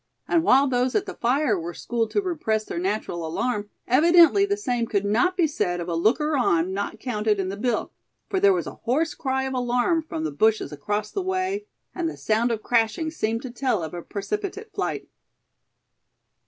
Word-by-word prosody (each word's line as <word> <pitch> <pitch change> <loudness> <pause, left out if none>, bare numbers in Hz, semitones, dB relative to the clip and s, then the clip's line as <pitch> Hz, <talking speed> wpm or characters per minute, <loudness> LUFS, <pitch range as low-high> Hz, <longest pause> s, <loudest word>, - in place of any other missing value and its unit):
And 335 - +3
while 275 -2 +5
those 250 0 0
at 405 - +2
the - - -6
fire 245 -4 +1
were 170 +1 -6
schooled 230 -2 -2
to 410 - 0
repress 255 - -1
their - - -4
natural 185 -2 -2
alarm, 205 +6 -2 0.2
evidently 340 +8 +6
the 405 0 0
same 245 - -1
could 205 -3 0
not 250 - +2
be 345 - +4
said 180 - -1
of 170 - -4
a 170 - -2
looker 260 - +2
on 185 -8 +2
not 200 +2 -3
counted 215 -4 0
in 190 -1 -1
the 195 - -4
bill; 230 +2 -1 0.4
for 385 - 0
there 400 +1 +6
was 370 - 0
a - - -6
hoarse 300 +7 0
cry 265 -1 -1
of 265 0 -3
alarm 250 +6 +1
from 235 - -5
the 155 - -2
bushes 215 +8 +1
across 205 +8 -3
the 395 - -2
way, 375 +2 -2 0.3
and 345 -3 -1
the - - -8
sound 225 +2 +1
of 225 -2 -2
crashing 235 +7 +1
seemed 230 -6 -2
to 255 - -6
tell 240 -7 0
of 160 - -6
a 175 - -5
precipitate 400 - -5
flight. - - -3
245 Hz, 200 wpm, -24 LUFS, 210-320 Hz, 0.4 s, evidently